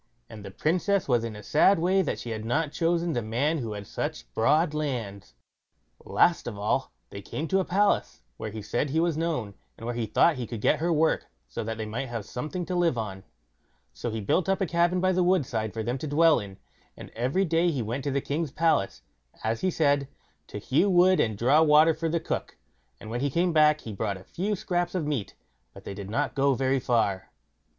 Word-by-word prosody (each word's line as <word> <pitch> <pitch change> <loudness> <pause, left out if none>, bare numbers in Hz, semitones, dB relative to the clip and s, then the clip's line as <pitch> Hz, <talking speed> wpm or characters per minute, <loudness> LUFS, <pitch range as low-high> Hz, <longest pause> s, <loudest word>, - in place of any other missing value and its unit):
And 105 -2 -10
the 100 - -7
Princess 180 - 0
was 120 -4 +2
in 115 -2 -5
a 105 - -10
sad 190 - +4
way 185 +4 +2
that 170 - -2
she 120 - -6
had 110 -1 -4
not 145 +6 0
chosen 170 0 0
the 120 - -1
man 130 +9 0
who 115 -4 -4
had 100 -1 -7
such - - -5
broad 150 +7 +2
lands. 115 - -4 0.7
Last 170 -6 +2
of 110 -4 -5
all, 105 +1 -1 0.2
they 100 - -7
came 155 +10 -5
to 195 - +3
a 190 - 0
palace, 200 +3 +1
where 110 - -5
he 105 0 -7
said 120 +7 -1
he 160 +4 0
was 170 -1 +1
known, 155 -11 -2 0.2
and 115 - -9
where 120 - -2
he 115 -2 -2
thought 155 +8 +3
he 120 -2 -4
could 115 - -6
get 145 - +2
her 170 +2 0
work, 160 0 +1 0.2
so - - -5
that 115 0 -4
they 110 - -4
might 115 +5 -4
have 115 -4 -5
something 155 +8 -5
to 185 - -4
live 175 -7 +2
on; 100 -4 -5 0.7
so 120 - -4
he 110 0 -3
built 160 - 0
up 195 - +2
a 195 - +1
cabin 175 +2 +1
by 185 0 +3
the 185 0 +1
woodside 130 - +1
for 110 +1 -4
them 120 +4 -2
to 155 - -4
dwell 160 +1 +4
in; 100 -3 -9 0.4
and - - -10
every 130 +12 0
day 170 +1 +2
he 140 -7 -1
went 120 +5 -4
to 145 - -1
the 140 0 0
king's 150 +1 -2
palace, 155 -11 0 0.4
as 110 +1 -1
he 185 - +2
said, 145 -5 +1 0.4
to - - -7
hew 135 - +1
wood 185 0 +5
and 110 -2 +1
draw 135 +8 +4
water 155 +1 +6
for 160 +1 -2
the 170 +1 0
cook, - - -4 0.4
and 110 - -9
when 120 +1 -2
he 140 - +1
came 170 +4 +1
back 155 -1 +4
he 110 - -7
brought 100 -1 -2
a 95 - -13
few 200 - -2
scraps 175 -1 -2
of 170 -5 -1
meat; 140 -10 -3 0.4
but - - -12
they - - -6
did 100 0 -8
not 135 +4 -1
go 140 0 +2
very 135 +1 +1
far. 110 -7 0
140 Hz, 230 wpm, -27 LUFS, 110-170 Hz, 0.7 s, water